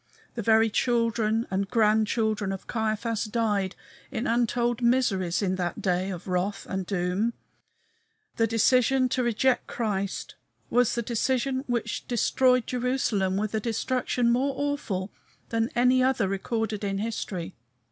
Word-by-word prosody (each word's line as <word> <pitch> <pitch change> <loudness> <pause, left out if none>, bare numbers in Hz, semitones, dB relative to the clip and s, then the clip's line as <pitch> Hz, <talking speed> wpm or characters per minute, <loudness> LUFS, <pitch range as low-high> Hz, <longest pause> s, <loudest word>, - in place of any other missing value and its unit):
The 235 - -4
very 220 +1 +4
children 230 -1 +1
and 195 +1 -1
grandchildren 215 -1 +2
of 195 - -6
Caiaphas 220 0 -1
died 210 -4 0 0.3
in 235 - -3
untold 240 0 +1
miseries 210 -8 +2
in 185 -1 0
that 175 +2 -2
day 185 -1 0
of 180 -1 -6
wrath 190 +2 -1
and 190 -2 -3
doom. 195 +4 0 1.0
The 225 - +3
decision 255 +3 +3
to 255 - 0
reject 245 +2 +1
Christ 200 -4 -3 0.4
was 245 -1 +3
the 235 - -1
decision 260 +3 0
which 240 -2 -2
destroyed 250 +1 +2
Jerusalem 240 -7 0
with 210 +1 -2
a 220 - +1
destruction 240 +2 0
more 265 +3 +1
awful 255 -10 -2 0.4
than 225 0 0
any 250 +1 +4
other 255 -5 +2
recorded 215 +2 -2
in 195 -1 -1
history. 200 -5 -4
225 Hz, 135 wpm, -27 LUFS, 195-245 Hz, 1.0 s, very